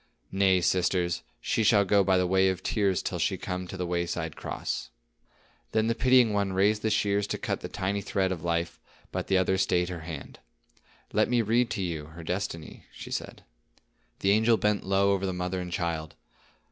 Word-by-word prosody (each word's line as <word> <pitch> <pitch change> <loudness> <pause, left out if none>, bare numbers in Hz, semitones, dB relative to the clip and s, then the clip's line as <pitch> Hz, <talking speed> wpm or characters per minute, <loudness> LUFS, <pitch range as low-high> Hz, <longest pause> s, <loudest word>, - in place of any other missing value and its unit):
Nay, 95 -1 +3
sisters, 90 0 +1 0.2
she 110 - 0
shall 100 -1 +5
go 100 +1 +4
by 95 0 +3
the 90 - +2
way 95 +1 +3
of 95 0 -3
tears 100 -4 +1
till - - -3
she - - 0
come 90 0 -4
to 95 - -7
the 90 - -2
wayside 85 -2 -2
cross." - - -4 0.8
Then 110 0 +2
the 115 - +2
pitying 125 -2 +4
one 100 -2 0
raised 105 +3 +2
the 110 - 0
shears 100 -1 +1
to - - -2
cut - - -2
the - - -4
tiny 100 0 -2
thread 95 -1 0
of 85 -3 -4
life, 85 0 -1 0.3
but - - -3
the 95 - +3
other 95 0 +2
stayed 90 -2 +1
her 90 -2 -5
hand. 80 -3 -8 0.7
"Let - - +3
me 120 -1 +2
read 115 +3 +2
to 100 -5 -2
you 80 -4 -3
her 80 +1 -11
destiny," 85 -2 -4
she - - -10
said. - - -5 0.8
The 95 - +3
angel 110 +2 +4
bent 105 -1 +1
low 100 +1 +2
over 100 0 0
the 95 - -2
mother 90 +1 -2
and 90 -1 -6
child. 80 -3 -3
95 Hz, 195 wpm, -28 LUFS, 90-100 Hz, 0.8 s, shall